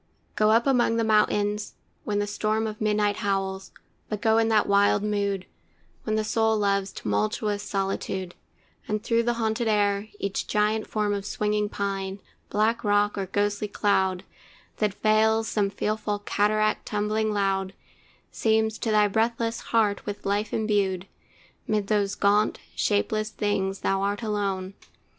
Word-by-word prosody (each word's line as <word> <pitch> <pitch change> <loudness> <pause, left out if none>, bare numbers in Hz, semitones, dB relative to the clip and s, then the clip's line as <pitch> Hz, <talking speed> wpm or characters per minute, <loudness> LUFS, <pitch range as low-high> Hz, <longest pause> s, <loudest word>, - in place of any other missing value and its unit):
Go 215 0 +3
up 230 +2 +4
among 250 -4 +3
the 230 - +1
mountains, 210 -1 +1 0.3
when 205 -1 -1
the 205 - +1
storm 215 +2 -1
Of 215 0 -5
midnight 210 -1 +1
howls, 195 -2 -2 0.4
but 210 - -3
go 220 +1 +3
in 225 - +2
that 220 -2 +3
wild 200 0 +3
mood, 200 -2 -1 0.6
When 215 - 0
the 220 - +1
soul 220 0 +1
loves 200 -1 +1
tumultuous 105 - -1
solitude, 195 -2 -3 0.5
And 215 0 -2
through 230 0 +2
the 240 +1 0
haunted 225 0 -1
air, 205 -1 +1
each 200 -1 -3
giant 215 +1 +1
form 210 -1 0
Of 200 0 -3
swinging 210 0 0
pine, 195 -1 -3 0.3
black 225 +3 +1
rock, 205 0 +2
or 195 -2 -3
ghostly 205 +2 0
cloud, 190 -3 +1 0.5
That 210 -2 0
veils 220 +1 +3
some 205 -2 0
fearful 210 +1 -2
cataract 215 +1 +1
tumbling 215 +1 0
loud, 195 -2 0 0.6
Seems 220 -1 +1
to 230 - -2
thy 210 -1 +4
breathless 230 +2 0
heart 215 -3 +1
with 205 0 -5
life 205 +2 0
embued. 200 -4 0 0.6
'Mid 210 -2 0
those 205 -1 0
gaunt, 205 +1 +2 0.2
shapeless 215 +1 0
things 200 -2 -1
thou 195 0 +1
art 205 +3 -1
alone! 200 -3 -2
210 Hz, 150 wpm, -26 LUFS, 200-215 Hz, 0.6 s, up